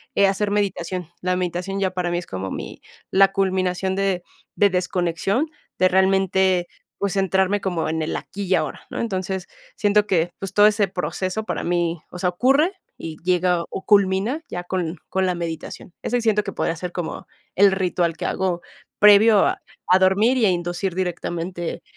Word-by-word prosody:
eh, 200 - +5
hacer 200 +1 0
meditación. 185 -4 -2
La 180 0 0
meditación 180 +2 -2
ya 190 -2 0
para 180 -1 -2
mí 175 - 0
es 175 - -4
como 95 0 -5
mi - - -7 0.3
la 195 0 +5
culminación 190 -1 0
de 195 -3 0 0.3
de 205 - +4
desconexión, 180 - 0 0.3
de 185 - +5
realmente, 190 -1 +2 0.3
pues, 200 -1 -1
centrarme 190 +1 +1
como 175 -5 -1
en 160 0 -1
el 155 - -2
aquí 200 +1 -6
y 185 - +2
ahora, - - -2
¿no?, - - -5
entonces, 190 -3 -3 0.3
siento 210 0 +2
que, 175 -3 +1
pues, 195 -1 -5
todo 205 0 +6
ese 210 -2 +2
proceso 185 +3 -3
para - - -3
mí, 170 -1 0
o 180 - -8
sea, 180 0 +1
ocurre 275 - +3 0.2
y 160 -1 -7
llega 180 -1 +2
o 190 - -6
culmina 200 +7 +3
ya 175 - -4
con 175 -2 -3
con 190 0 +1
la 180 - 0
meditación. 170 +1 -6
Eso 245 - 0
sí - - -1
siento 210 -2 +2
que 195 - -5
podría 165 - -1
ser 180 +2 -5
como 175 -2 -5 0.3
el 200 0 +6
ritual 175 -3 0
que - - -4
hago 180 -2 -1 0.4
previo 210 0 +7
a - - -1 0.3
a 185 +1 +6
dormir 200 +7 +4
y 225 - +3
a - - +4
inducir 175 +1 -2
directamente 175 -1 -3
185 Hz, 185 wpm, -22 LUFS, 175-195 Hz, 0.4 s, previo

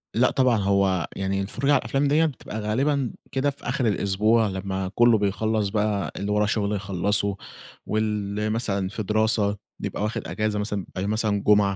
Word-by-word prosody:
لأ 125 +3 +4
طبعًا، 125 -4 +3
هو 95 -3 +1
يعني 95 0 -1
الفُرجة 130 +8 -1
على - - +5
الأفلام 140 +1 0
ديّة 155 +3 +3
بتبقى 125 -7 -5
غالبًا 130 +5 0 0.2
كده 135 +2 +1
في 140 - -9
آخِر 125 -1 0
الأسبوع 105 +2 +2
لمّا 95 -1 -3
كُلّه 120 -2 +5
بيخلّص 105 +1 0
بقى 105 -1 -1
اللي 100 +1 -3
وراه 105 0 +2
شُغل 105 -1 0
يخلّصه، 100 +1 +1 0.5
واللي 105 -1 -1
مثلًا 100 -4 -1
في 105 +2 -4
دراسة 110 0 +2 0.2
بيبقى 105 - -3
واخِد 110 - -3
إجازة 105 -1 -1
مثلًا 105 -2 -2
بيبقي 95 +2 -5
مثلًا 105 -1 0
جُمعة 100 -2 +4
105 Hz, 170 wpm, -24 LUFS, 100-115 Hz, 0.5 s, على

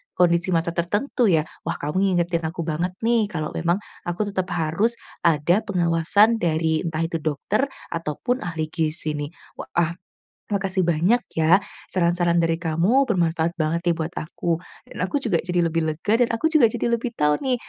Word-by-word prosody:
kondisi 175 0 +3
mata 165 0 +1
tertentu 205 +9 0
ya. 160 -5 +3 0.2
Wah, - - 0
kamu 150 +6 -2
ngingetin 175 -3 +1
aku 165 +1 -4
banget 170 +3 -2
nih 230 -2 +3
kalau 155 -6 -4
memang, 170 +1 +1 0.3
aku 175 +5 -1
tetap 190 -3 -2
harus, 175 +9 +1 0.3
ada 170 +5 +3
pengawasan 185 +4 +3
dari 160 -2 +1
entah 160 0 -1
itu 165 0 -2
dokter, 160 - 0 0.2
ataupun 165 - -2
ahli 160 -5 -4
gizi 155 -1 -2
nih. 145 -1 -3 0.3
Wa - - -6
ah, 170 -1 +2 0.6
makasih 195 -2 0
banyak 175 +9 +2 0.2
ya, 170 +5 +5 0.2
saran-saran 175 -1 +1
dari 165 0 +1
kamu 180 - +2
bermanfaat 170 -1 +1
banget 160 0 0
nih 170 - +3
buat 165 +1 -3
aku, 165 +1 -2 0.3
dan - - -9
aku - - -4
juga 185 -8 +1
jadi 175 0 0
lebih 165 -1 0
lega 205 +9 0
dan 245 - +4
aku 320 +8 0
juga 300 -7 +6
jadi 235 +1 -2
lebih 235 0 -1
tahu 150 -3 +2
nih, 260 -2 0
170 Hz, 175 wpm, -23 LUFS, 160-200 Hz, 0.6 s, juga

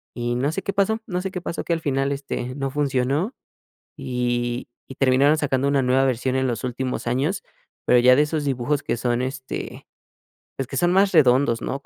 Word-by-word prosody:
Y 120 0 -2
no 135 +4 0
sé 195 +4 -4
qué 195 - -2
pasó 200 +3 +1
no 180 -2 -2
sé 190 0 -4
qué 180 - -4
pasó, 170 - -4
que - - -4
al 165 - -1
final 135 -2 0
este 135 -2 -4
no 135 -1 -3
funcionó, 140 - 0 0.6
y 120 -1 -2 0.2
y 135 - -10
terminaron 135 +3 +4
sacando 140 -2 0
una 140 -1 +2
nueva 130 +2 +3
versión 130 0 0
en 130 0 +1
los 120 0 -3
últimos 125 0 -3
años, 135 +10 0 0.4
pero 125 - +5
ya 125 +1 +6
de 145 - +4
esos 150 0 -2
dibujos 140 +1 0
que 120 - -1
son 120 0 0
este, 130 +1 -5 0.7
pues, 135 - -3
que - - -5
son 175 0 +2
más 195 +1 +4
redondos, 130 -5 +4
¿no? 135 - -3
Como - - -40
135 Hz, 210 wpm, -23 LUFS, 125-150 Hz, 0.7 s, ya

